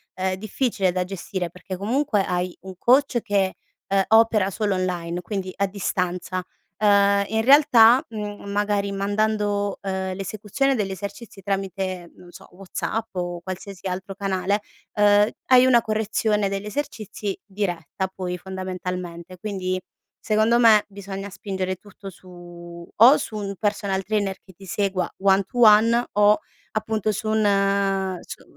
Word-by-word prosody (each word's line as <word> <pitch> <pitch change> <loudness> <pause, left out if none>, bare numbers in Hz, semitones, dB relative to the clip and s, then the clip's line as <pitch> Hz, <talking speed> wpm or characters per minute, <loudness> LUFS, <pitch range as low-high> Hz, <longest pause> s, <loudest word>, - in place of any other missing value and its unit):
ehm, 185 0 -1
difficile 210 -1 -1
da 180 0 -1
gestire 180 -1 -4
perché 180 +2 -8
comunque 220 +2 +1
hai 180 0 -2
un 190 0 -9
coach 255 +3 +3
che, 200 -4 0 0.3
ehm, 195 0 +2
opera 220 -3 +4
solo 205 0 -1
online, 180 -2 -2
quindi 190 0 -4
a 200 - +1
distanza, 185 -2 -2 0.4
ehm, 200 -1 +4
in 220 +1 0
realtà, 255 -3 +7
mhmm, 210 -2 -6
magari 205 0 0
mandando, 205 0 0
uhm, 190 -1 -3
l'esecuzione 210 +7 -1
degli 205 -4 -2
esercizi 200 +2 -8
tramite 190 -2 -3
non 175 -1 -15
so, - - -14
WhatsApp 195 +4 -4
o 175 -1 -3
qualsiasi 190 +1 -7
altro 190 +2 -5
canale, 195 +1 -1 0.3
uhm, 205 0 +5 0.2
hai 255 -1 +7
una 245 -2 +5
correzione 215 -2 0
degli 195 +1 -4
esercizi 210 -4 -4
diretta 190 -3 -3
poi 180 -1 -4
fondamentalmente. 180 -1 -6
Quindi 185 -2 -3 0.4
secondo 220 +2 +3
me, 220 -3 +6
bisogna 195 0 -7
spingere 190 -1 -3
tutto 200 0 -12
su 175 -1 -12
o 245 +7 +8
su 215 - -5
un 200 -1 -4
personal 200 -2 -1
trainer 200 -2 -1
che 190 - -17
ti 195 +3 -14
segua 190 0 -1
one 195 0 +4
to 245 +5 -7
one 230 +2 +6
o 210 +1 +5 0.4
appunto 215 -1 -1
su 215 +2 -4
un 195 -3 +1
su - - -10
200 Hz, 140 wpm, -23 LUFS, 185-215 Hz, 0.4 s, o